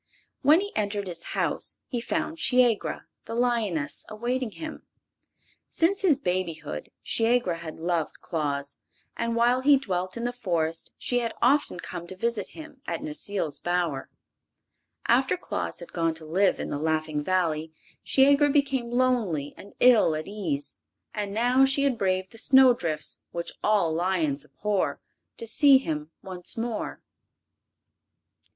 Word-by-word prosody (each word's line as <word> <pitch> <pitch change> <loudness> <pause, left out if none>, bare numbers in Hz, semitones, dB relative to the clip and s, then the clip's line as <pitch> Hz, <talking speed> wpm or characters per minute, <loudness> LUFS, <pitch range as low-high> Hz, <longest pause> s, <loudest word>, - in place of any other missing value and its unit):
When 300 +6 +6
he 410 +1 -6
entered 205 -1 -1
his 175 -3 -3 0.2
house - - -1
he 245 -4 -3
found 315 +6 -2
Shiegra, 250 -6 +2 0.2
the 230 - -5
lioness, 225 -11 0
awaiting 240 +3 -2
him. 315 +8 -8 0.9
Since 375 +5 +1
his 340 -8 +4
babyhood 175 - -3
Shiegra 225 -6 +2
had 160 -2 -7
loved 165 -1 -2
Claus, 140 -4 -3 0.4
and 235 0 -1
while 240 +2 +3
he 280 +1 +6
dwelt 185 -6 -3
in 235 - -4
the 245 0 -1
Forest 165 -8 -2
she 245 - 0
had 230 -1 -3
often 270 -7 +2
come 170 0 -7
to 185 - -7
visit 230 +3 -1
him 310 -4 -11
at - - -2
Necile's 205 - -3
bower. 175 -6 -1 1.0
After - - +3
Claus 85 - -4
had 175 - -11
gone 165 -1 0
to 160 -1 -7
live 185 +5 +2
in - - -4
the 145 - -3
Laughing 155 -1 -1
Valley 160 -3 0 0.3
Shiegra 280 +2 +5
became 275 -4 +1
lonely 235 - +1
and 200 - -13
ill 235 -10 +6
at 155 0 -4
ease, 170 -9 -2 0.4
and 205 -1 -3
now 245 +5 +3
she 270 +1 +3
had 270 -4 +1
braved 185 -1 0
the 225 - -9
snow 265 0 +7
drifts, 155 -8 -3
which 170 0 -3
all 200 -7 +3
lions 165 -5 0
abhor, 205 -2 -1 0.4
to 230 - -6
see 275 +4 +6
him 155 - -3
once 180 +1 -6
more. 230 -1 -3
205 Hz, 145 wpm, -27 LUFS, 165-250 Hz, 1.0 s, snow